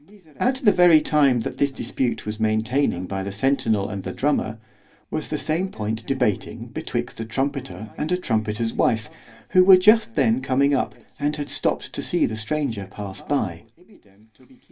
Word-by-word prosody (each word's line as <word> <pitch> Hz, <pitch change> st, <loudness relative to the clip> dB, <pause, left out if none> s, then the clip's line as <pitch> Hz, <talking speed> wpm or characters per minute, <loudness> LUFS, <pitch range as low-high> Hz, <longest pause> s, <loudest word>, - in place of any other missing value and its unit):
At 255 Hz, +2 st, +1 dB
the 210 Hz, -, +6 dB
very 175 Hz, -4 st, +6 dB
time 140 Hz, -6 st, +3 dB
that -, -, -5 dB
this 140 Hz, -, +3 dB
dispute 130 Hz, -2 st, -2 dB
was 105 Hz, +1 st, -5 dB
maintaining 110 Hz, -2 st, 0 dB
by 95 Hz, +1 st, -4 dB
the 100 Hz, -, -4 dB
centinel 110 Hz, -2 st, +1 dB
and 100 Hz, -, -5 dB
the -, -, -5 dB
drummer—was 110 Hz, -6 st, -4 dB
the -, -, -2 dB
same 170 Hz, +5 st, -1 dB
point 110 Hz, -, -4 dB
debating 125 Hz, -7 st, -1 dB
betwixt -, -, -4 dB
a 115 Hz, -, -3 dB
trumpeter 120 Hz, -5 st, -3 dB
and 155 Hz, +3 st, -2 dB
a 180 Hz, -, +2 dB
trumpeter's 110 Hz, -6 st, -1 dB
wife, 110 Hz, -1 st, 0 dB, 0.4 s
who 185 Hz, -, +6 dB
were 190 Hz, 0 st, +9 dB
just 210 Hz, -, +4 dB
then 115 Hz, +3 st, +2 dB
coming 140 Hz, +2 st, +2 dB
up, 135 Hz, -, 0 dB, 0.2 s
and 145 Hz, +1 st, 0 dB
had 145 Hz, -1 st, -5 dB
stopped -, -, -1 dB
to -, -, -3 dB
see -, -, +2 dB
the 110 Hz, -, -3 dB
stranger 110 Hz, -3 st, -2 dB
pass 100 Hz, -1 st, -7 dB
by. 100 Hz, -, -2 dB
120 Hz, 165 wpm, -23 LUFS, 110-145 Hz, 0.4 s, were